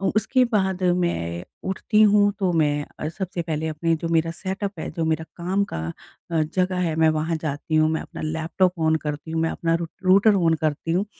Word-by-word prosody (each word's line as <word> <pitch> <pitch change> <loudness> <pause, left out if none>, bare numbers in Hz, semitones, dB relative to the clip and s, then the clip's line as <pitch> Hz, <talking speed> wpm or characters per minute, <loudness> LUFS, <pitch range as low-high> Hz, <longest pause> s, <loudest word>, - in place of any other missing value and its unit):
उसके 220 +4 +3
बाद 190 -5 0 0.2
मैं 85 - -2 0.3
उठती 210 +3 +1
हूँ 205 -1 +5
तो 190 -3 +1
मैं 145 -2 +1
अ, 150 - -2
सबसे 180 +1 -4
पहले 160 -1 -2
अपने 165 +1 0
जो 165 +1 -4
मेरा 165 0 +2
सेटअप 195 +1 -3
है - - -4
जो 165 - 0
मेरा 160 0 0
काम 185 +4 0
का - - -2 0.5
अ, 160 - +2
जगह 180 +4 0
है 160 - -2
मैं 160 0 +4
वहाँ 160 +2 -1
जाती 150 +1 -3
हूँ 155 0 +4
मैं 160 - -1
अपना - - -9
लैपटॉप 160 +3 0
ऑन 160 - +4
करती 150 +2 -4
हूँ 160 - 0
मैं 165 - +1
अपना 165 -1 0
रूट 165 -1 -3
रूटर 200 +3 +5
ऑन 170 -4 +3
करती 155 +2 -1
हूँ 185 +5 +1
165 Hz, 210 wpm, -23 LUFS, 160-190 Hz, 0.5 s, हूँ